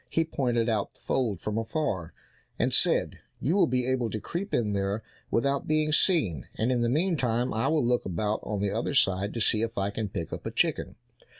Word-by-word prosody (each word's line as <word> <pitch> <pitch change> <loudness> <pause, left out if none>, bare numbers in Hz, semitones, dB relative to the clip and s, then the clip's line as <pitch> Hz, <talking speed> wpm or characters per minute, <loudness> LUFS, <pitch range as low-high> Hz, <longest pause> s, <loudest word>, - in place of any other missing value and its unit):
He 165 - +1
pointed 120 -6 0
out 110 -3 -1
the - - -16
fold 115 -9 -1
from 105 +1 -2
afar, 110 - -2 0.5
and - - +1
said, - - +3 0.2
"You 160 +7 +1
will 200 - +5
be 125 0 +1
able 130 -3 0
to 110 - -3
creep 190 - -4
in 105 -4 +1
there 100 +2 -1 0.3
without 140 +3 0
being 155 0 +2
seen, 140 - +2
and 115 +4 0
in 125 -2 +1
the 120 - +2
meantime 130 -6 +1
I 110 - 0
will 155 -5 +2
look 120 0 +2
about 105 +4 -1
on 105 -2 -3
the 100 -1 0
other 115 +7 -2
side 95 -4 +2
to - - -2
see 110 0 +2
if 115 0 -3
I 100 0 0
can 105 0 -3
pick 85 -3 -5
up - - -5
a - - -3
chicken." - - 0
115 Hz, 215 wpm, -28 LUFS, 105-140 Hz, 0.5 s, will